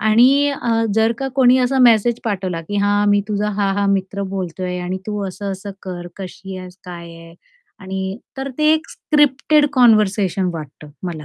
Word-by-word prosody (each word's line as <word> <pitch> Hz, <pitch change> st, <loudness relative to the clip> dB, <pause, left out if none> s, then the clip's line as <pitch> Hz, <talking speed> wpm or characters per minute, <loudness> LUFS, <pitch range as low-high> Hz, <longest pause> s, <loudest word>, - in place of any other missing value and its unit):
आणि 255 Hz, +7 st, +4 dB
अ, 260 Hz, -4 st, -3 dB, 0.2 s
जर 225 Hz, +1 st, +3 dB
का 270 Hz, 0 st, -2 dB
कोणी 260 Hz, -1 st, +5 dB
असा 255 Hz, +1 st, +1 dB
मेसेज 235 Hz, -1 st, +4 dB
पाठवला, 185 Hz, -5 st, -2 dB
की 205 Hz, +6 st, -5 dB
"हां, 205 Hz, 0 st, +2 dB
मी 205 Hz, 0 st, +4 dB
तुझा 210 Hz, 0 st, -1 dB
हा-हा 200 Hz, 0 st, +1 dB
मित्र 200 Hz, 0 st, -1 dB
बोलतोय 180 Hz, -1 st, -4 dB
आणि 180 Hz, +1 st, -3 dB
तू 210 Hz, -1 st, -3 dB
असं-असं 195 Hz, +1 st, -6 dB
कर, 175 Hz, -2 st, -6 dB
कशी 190 Hz, 0 st, -8 dB
आहेस, 185 Hz, 0 st, -10 dB
काय 175 Hz, -2 st, -8 dB
आहे? 165 Hz, 0 st, -14 dB, 0.5 s
आणि" 190 Hz, +1 st, -4 dB, 0.2 s
तर 270 Hz, +1 st, -4 dB
ते 305 Hz, 0 st, +4 dB
एक 315 Hz, 0 st, -1 dB
स्क्रिप्टेड 295 Hz, 0 st, +2 dB
कन्व्हर्सेशन 210 Hz, -6 st, +3 dB
वाटतं 150 Hz, -2 st, -9 dB, 0.2 s
मला. 160 Hz, -3 st, -5 dB
200 Hz, 165 wpm, -19 LUFS, 185-240 Hz, 0.5 s, कोणी